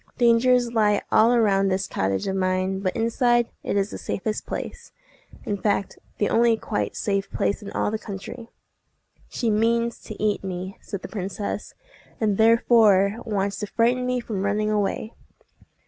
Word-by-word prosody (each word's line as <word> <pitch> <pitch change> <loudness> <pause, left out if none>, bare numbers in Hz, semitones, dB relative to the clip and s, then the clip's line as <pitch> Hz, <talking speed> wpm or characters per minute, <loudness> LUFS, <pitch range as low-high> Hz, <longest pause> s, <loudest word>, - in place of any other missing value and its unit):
Dangers 240 0 +3
lie 210 -2 +2
all 225 +2 +5
around 200 -5 +3
this 190 0 0
cottage 95 0 -1
of 190 - -1
mine; 185 0 0
but 185 -1 -2
inside, 240 +1 +2
it - - -2
is 200 +1 0
the - - -6
safest 215 +2 -3
place—in 205 - -7
fact 200 -2 -1 0.2
the 205 - +1
only 230 -1 +3
quite 215 - -3
safe 200 -1 -1
place 200 - -1
in 200 - -8
all - - 0
the 220 - -2
country." 225 +4 -8 0.8
"She 235 -3 -1
means 230 +2 +1
to 215 - -9
eat 210 -1 0
me," 185 0 -5
said 200 - -7
the - - -5
princess, 200 +1 -5 0.4
"and 210 -3 0
therefore 220 -3 +5
wants 200 -3 -1
to 210 - -3
frighten 245 +4 +1
me 250 0 0
from 215 -5 -4
running 210 +2 0
away." 210 +2 -1
210 Hz, 160 wpm, -24 LUFS, 195-230 Hz, 0.8 s, all